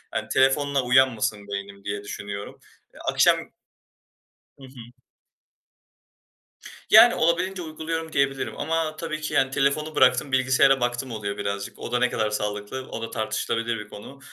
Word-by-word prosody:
yani, 110 0 -3
telefonla 135 +1 +2
uyanmasın 120 -5 +2
beynim 100 0 -7
diye 100 0 -4
düşünüyorum. 100 0 -7 0.3
Eee, - - -16
akşam - - +4 1.2
Hı 135 - -16
hı. 125 -1 -14 1.9
Yani 230 +2 +8
olabildiğince 180 +3 0
uyguluyorum 160 0 -5
diyebilirim 135 -1 0
ama 160 -1 -1
tabii 155 -2 -5
ki 155 - -4
yani 135 0 +2
telefonu 150 +3 0
bıraktım 130 +1 +3
bilgisayara 130 +1 +4
baktım 120 +1 -2
oluyor 100 -2 -4
birazcık. 100 0 -4
O - - -7
da 120 - +1
ne 125 - +2
kadar 110 -1 -1
sağlıklı 105 +5 -4
o 115 - -6
da 115 - -6
tartışılabilir 115 +1 -2
bir 105 0 -10
konu 135 +7 -11
130 Hz, 140 wpm, -24 LUFS, 105-145 Hz, 1.9 s, Yani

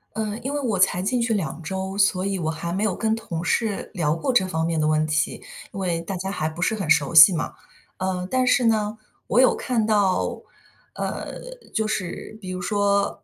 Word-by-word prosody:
嗯， 215 +1 -3
因 270 - -2
为 290 - -1
我 235 -8 -1
才 180 -1 +3
进 240 +6 0
去 230 -1 +1
2 170 -5 -3
周， 190 +4 -4
所 195 -2 +2
以 195 -1 -1
我 160 -3 -1
还 170 +2 -4
没 195 +3 -1
有 215 -3 +1
跟 220 +4 0
同 170 -7 -5
事 210 +3 -1
聊 155 -4 +1
过 170 +11 -1
这 235 -6 +4
方 160 -3 -1
面 165 -1 -1
的 155 - +1
问 155 0 +2
题， 150 0 -1 0.3
因 200 - -6
为 175 -3 -1
大 185 +3 -5
家 190 +2 -4
还 155 -5 -2
不 160 +2 -8
是 220 +5 +1
很 190 -7 -4
熟 150 +1 +3
悉 160 +4 +10
嘛。 160 - -3 0.4
呃， 185 -1 -2
但 255 +2 +1
是 250 -1 +3
呢， 215 -1 +1 0.3
我 235 - +2
有 260 - +5
看 235 -4 -1
到， 205 -4 +1 0.5
呃， - - -4 0.4
就 220 -1 0
是 215 +1 -4
比 185 - -7
如 185 0 -4
说， 200 +1 0
190 Hz, 225 characters per minute, -23 LUFS, 170-215 Hz, 0.5 s, 悉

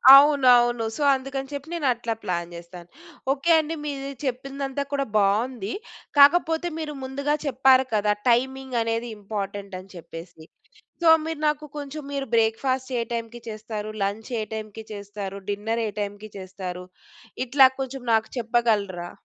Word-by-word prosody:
అవునవును. 250 -5 +6
సో, - - -6
అందుకని 270 0 -4
చెప్పి 285 +1 -5
నేను 310 -5 -1
అట్లా 235 -1 -3
ప్లాన్ 175 -1 -2
చేస్తాను. 170 0 -11 0.4
ఓకే 285 +4 +1
అండి, 315 +1 -2
మీరు 275 -1 -4
చెప్పిందంతా 275 +2 -3
కూడా 275 -1 +1
బావుంది. 210 +2 +1 0.5
కాకపోతే 325 +3 +5
మీరు 305 -2 -4
ముందుగా 280 +3 -1
చెప్పారు 265 -1 +5
కదా! 210 0 +3 0.2
టైమింగ్ 265 +1 +1
అనేది 230 +1 -1
ఇంపార్టెంట్ 200 -1 -5
అని 185 +1 -14
చెప్పేసి. 165 -1 -10 0.6
సో, 335 - +5 0.2
మీరు 320 -1 -4
నాకు 300 0 -1
కొంచెం, 290 +1 -6
మీరు 275 -1 -2
బ్రేక్ఫాస్ట్ 255 +4 +1
ఏ - - +1
టైమ్‌కి 235 0 -4
చేస్తారు, 215 -1 -5
లంచ్ 205 +5 -2
ఏ - - -1
టైమ్‌కి 220 0 -7
చేస్తారు, 200 -1 -6
డిన్నర్ 220 +3 -1
ఏ - - -3
టైమ్‌కి 205 +1 -5
చేస్తారు? 185 -1 -6 0.6
ఇట్లా 265 +1 +7
కొంచెం 265 0 -4
నాకు 220 0 +2
చెప్పగలరా? 215 -7 0
235 Hz, 140 wpm, -25 LUFS, 205-275 Hz, 0.6 s, ఇట్లా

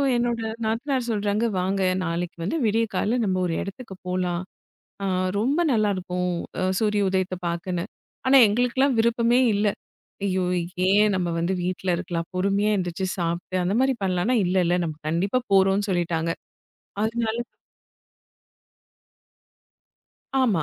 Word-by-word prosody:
என்னோட 240 -1 0 0.3
நாத்தனார் 245 +3 -1
சொல்றாங்க, 210 +1 0
"வாங்க 190 +1 0 0.2
நாளைக்கு 170 +1 -3
வந்து 200 - -1
விடியற்கால்ல 225 +1 +1
நம்ம 185 -2 0
ஒரு 165 - -1
இடத்துக்கு 195 0 -7
போலாம்" 180 -1 -1 0.6
அ - - 0 0.3
ரொம்ப 275 +9 +1
நல்லா 215 -3 +2
இருக்கும் 180 0 -2 0.3
அ - - +1 0.2
சூரிய 210 -1 +2
உதயத்தை 185 -1 -1
பார்க்கன்னு. 170 +1 -2 0.4
ஆனா 270 +1 +7
எங்களுக்கெல்லாம் 245 +4 +2
விருப்பமே 235 +1 +3 0.2
இல்ல. 205 +1 +2 0.6
ஐயோ 185 -1 +1 0.5
ஏன்? 210 +2 +5
நம்ம 180 -2 0
வந்து 170 +3 0
வீட்ல 180 0 -1
இருக்கலாம். 170 -1 -3
பொறுமையா 200 +3 +1
எந்திருச்சு 180 0 -2
சாப்பிட்டு 170 +2 -2
அந்த 185 +3 0
மாதிரி 265 0 +3
பண்ணலாம்ன்னா, 190 +6 +1
இல்ல, 180 +1 0
இல்ல 175 - +2
நம்ம 155 - -3
கண்டிப்பா 185 +9 +1
போறோம்ன்னு 195 +1 +4
சொல்லிட்டாங்க. 170 -2 0 0.7
அதனால 225 0 -1 3.0
ஆமா, 225 -12 +3
195 Hz, 125 wpm, -24 LUFS, 180-225 Hz, 3.0 s, ஆனா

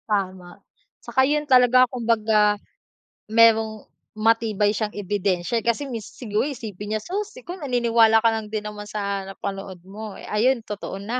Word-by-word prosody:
Tama, 185 -3 -2 0.4
tsaka 240 +2 +1
yun 300 +2 0
talaga 255 -2 +6
kumbaga 220 -3 +2 0.7
merong 220 -1 +4 0.3
matibay 215 -2 +2
siyang 215 0 -2
ebidensiya 200 +1 -1
kasi 235 +5 0
may 230 -3 -4
si 240 - -11
siguro 210 +1 +1
isipin 215 -6 -6
niya, 215 - -2
so, 395 - -2
si - - -14
ko 355 - -5
naniniwala 235 -6 +3
ka - - +5
lang 220 -1 -4
din 215 -1 -3
naman 210 0 -7
sa 200 -1 -3
napanood 195 -1 -6
mo. 210 +1 -8
Eh, - - -10
ayun, 240 +5 +2
totoo 205 -2 -6
na. 230 +5 -3
220 Hz, 160 wpm, -23 LUFS, 205-235 Hz, 0.7 s, talaga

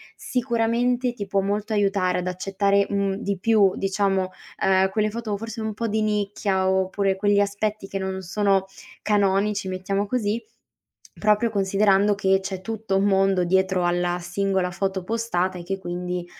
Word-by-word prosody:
sicuramente 245 0 0
ti 210 -4 -5
può 195 0 0
molto 205 +2 -2
aiutare 195 -3 +1
ad 180 - -4
accettare, 195 +2 +1
mhmm, 200 -1 0
di 200 -1 -3
più, 220 +1 +3
diciamo, 195 -1 0 0.3
ehm, 190 0 +3
quelle 215 +2 0
foto 220 -2 -4
forse 225 +1 -6
un 220 -1 -3
po' 230 +2 -3
di 220 +1 0
nicchia 200 -2 0
oppure 190 +1 +1
quegli 205 +1 +2
aspetti 205 0 -1
che 195 - -4
non 190 0 -3
sono 195 +1 +1 0.4
canonici, 200 0 +1
mettiamo 195 +2 -2
così, 220 0 -1 0.7
proprio 210 +2 +2
considerando, 200 0 +3
che 190 0 +2
c'è 190 -1 -5
tutto 220 -1 -3
un 195 - +2
mondo 195 -2 +3
dietro 190 0 +1
alla 175 0 0
singola 185 +1 -1
foto 190 0 -2
postata 190 -5 -1
e - - -7
che 195 +2 -4
quindi, 180 -1 -4
195 Hz, 155 wpm, -24 LUFS, 190-210 Hz, 0.7 s, più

